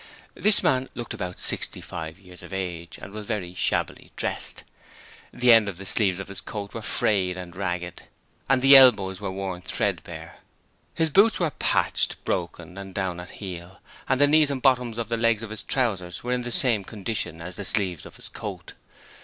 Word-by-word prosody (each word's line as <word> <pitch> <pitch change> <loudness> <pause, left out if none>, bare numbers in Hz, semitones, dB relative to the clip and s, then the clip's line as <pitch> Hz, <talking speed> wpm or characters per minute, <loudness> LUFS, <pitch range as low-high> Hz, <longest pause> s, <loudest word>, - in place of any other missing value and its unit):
This 215 0 +3
man 130 0 +2
looked 120 -1 -5
about 90 -1 -5
sixty - - -1
five 80 0 -7
years 90 -2 -15
of - - -11
age, 85 -3 -4
and 95 - -10
was 105 -1 -7
very 100 -6 -3
shabbily 90 - -1
dressed. - - -1 0.7
The 125 -1 +5
ends 110 -3 +5
of 95 - -7
the 95 - -8
sleeves 95 -2 +2
of 95 - -6
his 100 - -1
coat 105 -3 -6
were 115 - -5
frayed 95 -4 +1
and 90 -2 -8
ragged, 90 -2 -3 0.5
and 135 -1 +3
the 135 +1 +9
elbows 105 -8 +7
were 100 - -2
worn 95 -1 -4
threadbare. - - -3 0.6
His 160 -1 +1
boots 210 +8 +5
were 170 -4 +1
patched, - - +1
broken, 90 +2 -3
and 95 -1 -9
down 95 -3 -2
at 90 - -8
heel, 90 -1 -8 0.3
and 130 - +2
the 145 - +7
knees 150 0 +4
and 140 -2 -2
bottoms 125 -3 +2
of 115 -2 -3
the 115 - 0
legs 115 -1 +2
of 110 - -7
his 110 - -4
trousers 95 -9 -1
were 125 - -2
in 125 - 0
the 120 - -4
same 115 -5 +3
condition 100 -5 -3
as 90 +2 -7
the 100 - -5
sleeves 95 -4 -1
of - - -14
his - - -7
coat. - - -7
100 Hz, 195 wpm, -25 LUFS, 90-120 Hz, 0.7 s, the